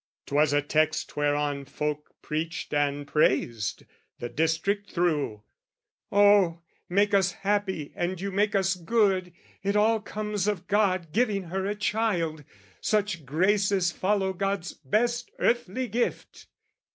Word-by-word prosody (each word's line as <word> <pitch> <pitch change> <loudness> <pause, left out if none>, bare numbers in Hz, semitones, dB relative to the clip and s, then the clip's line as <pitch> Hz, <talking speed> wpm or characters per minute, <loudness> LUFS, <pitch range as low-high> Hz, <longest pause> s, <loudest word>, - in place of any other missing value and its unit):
'Twas 145 +1 +2
a 145 0 +2
text 155 +2 0
Whereon 145 -1 0
folk 150 +2 -4
preached 160 +2 -3
and 145 0 0
praised, 115 -7 +1 0.3
the 120 - -5
district 165 - 0
through: 150 - 0 0.7
"Oh, 200 -4 +4 0.3
make 205 +3 +2
us 190 -2 +3
happy 195 -6 -1
and 175 +1 -2
you 200 +1 -3
make 205 +2 +1
us 190 -1 +2
good! 185 0 +1 0.3
"It 200 +1 -1
all 220 +2 +4
comes 210 -1 -3
of 200 -4 -1
God 185 -5 +1
giving 215 -4 +1
her 190 +2 -2
a 205 - -1
child: 205 -8 -1 0.4
"Such 200 -8 0
graces 190 +3 +2
follow 190 0 0
God's 195 -2 -2
best 235 - -1
earthly 240 +1 0
gift!" 235 +3 -3
190 Hz, 125 wpm, -27 LUFS, 155-205 Hz, 0.7 s, Oh